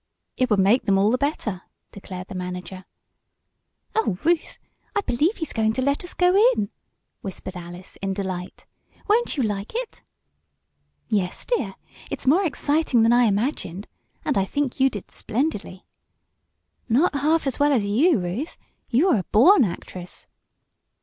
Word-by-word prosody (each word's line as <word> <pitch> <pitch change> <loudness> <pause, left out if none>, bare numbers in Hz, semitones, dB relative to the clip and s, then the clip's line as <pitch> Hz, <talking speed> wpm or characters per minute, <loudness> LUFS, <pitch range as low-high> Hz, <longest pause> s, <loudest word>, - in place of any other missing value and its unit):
"It 255 0 +1
would 210 - +3
make 200 +6 +4
them 195 -1 +3
all 200 +3 +3
the 250 - +2
better," 230 - -1 0.3
declared 185 -2 -8
the - - -8
manager. 180 0 -6 1.1
"Oh, 435 - +1
Ruth! 335 -1 +1 0.4
I 410 - +3
believe 315 - +1
he's 320 - -5
going 220 -1 +1
to 260 - -1
let 280 +4 +1
us 355 - -8
go 360 +1 +3 0.2
in!" 200 - -2 0.5
whispered 190 -1 -6
Alice 175 +1 -9
in 195 -1 -2
delight. 185 -2 -5 0.4
"Won't 440 -4 +2
you 265 - +2
like 205 - -3
it?" 485 -1 -4 1.1
"Yes, 195 -5 -1
dear! 485 - -1 0.3
It's - - -5
more 320 +9 +4
exciting 285 -5 +1
than 230 +1 +5
I 245 0 +5
imagined. 205 - -1 0.4
And 290 -9 +2
I - - +2
think 275 +6 -2
you 270 +1 +5
did 205 -6 -8
splendidly!" 220 -6 -3 1.0
"Not 275 +11 +3
half 305 +3 +1
as 270 0 -2
well 290 +1 +4
as 235 -7 +2
you, 260 - +3
Ruth. 195 - -4 0.3
You 295 +11 +3
are 250 - +4
a - - -3
born 265 - +6
actress!" 180 -1 -6
230 Hz, 155 wpm, -24 LUFS, 195-295 Hz, 1.1 s, born